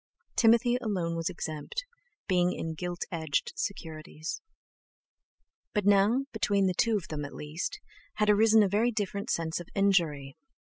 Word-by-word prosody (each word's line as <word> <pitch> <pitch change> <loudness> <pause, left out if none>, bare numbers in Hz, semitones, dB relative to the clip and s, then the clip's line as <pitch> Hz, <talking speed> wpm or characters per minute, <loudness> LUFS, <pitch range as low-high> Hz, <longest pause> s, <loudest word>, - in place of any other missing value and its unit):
Timothy 235 +1 +4
alone 185 -8 -2
was 165 +1 -1
exempt, 165 - -5 0.4
being 180 -2 +2
in 160 0 -4
gilt 175 +2 -4
edged 160 -4 -1
securities. 160 -4 -5 1.3
But 210 -2 +1
now, 205 +6 +4
between 200 -3 +2
two 230 +1 +3
of 185 - -7
them 150 -2 -3
at 145 - -7
least, 160 - -4 0.4
had 210 - +1
arisen 215 +1 +6
a - - +3
very 210 +5 +2
different 205 -3 -3
sense 165 0 -1
of 175 - -9
injury. 165 -9 +1
190 Hz, 140 wpm, -29 LUFS, 165-215 Hz, 1.3 s, arisen